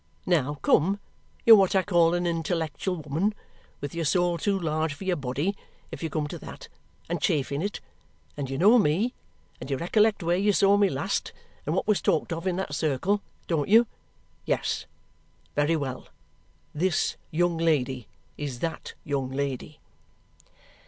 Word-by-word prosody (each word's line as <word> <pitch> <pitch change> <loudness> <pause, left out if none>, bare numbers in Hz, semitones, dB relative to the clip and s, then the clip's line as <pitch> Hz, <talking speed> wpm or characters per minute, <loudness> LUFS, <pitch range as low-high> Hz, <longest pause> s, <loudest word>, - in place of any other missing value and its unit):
Now, 150 -5 +1
come, 195 +6 +3 0.5
you're 225 - +11
what 195 -2 +3
I 190 - +4
call 175 -3 +3
an 175 0 -1
intellectual 165 +1 -1
woman 165 +9 0 0.5
with 145 - -5
your 170 0 -2
soul 175 +2 +2
too 200 +3 +1
large 155 -2 -1
for 195 - -9
your 185 -2 +1
body, 145 +7 -2 0.4
if - - -7
you 165 - -2
come 150 0 -1
to - - -6
that, - - -10 0.4
and - - -2
chafing 140 0 0
it 200 +2 -3 0.5
and 135 -2 -4
you 135 - -3
know 215 - +6
me, 205 - +2 0.5
and - - -8
you 135 - 0
recollect 210 +5 +2
where 170 +1 +2
you 205 +1 +3
saw 195 +1 +5
me 205 -1 +4
last, - - -2 0.3
and - - 0
what - - 0
was 210 -2 +2
talked 165 +1 +1
of 165 +3 -4
in 180 - +1
that 185 -5 -3
circle. 160 +7 0 0.2
Don't 160 -2 -1
you? 225 +3 +7 0.6
Yes! - - -1 0.7
Very 145 +3 +2
well. 135 -4 -4 0.7
This 170 +2 +1
young 170 +1 +1
lady 135 -7 +1 0.3
is 140 -4 -4
that 165 -1 -4
young 135 -3 -1
lady." 140 +2 -4
165 Hz, 165 wpm, -27 LUFS, 145-190 Hz, 0.7 s, you're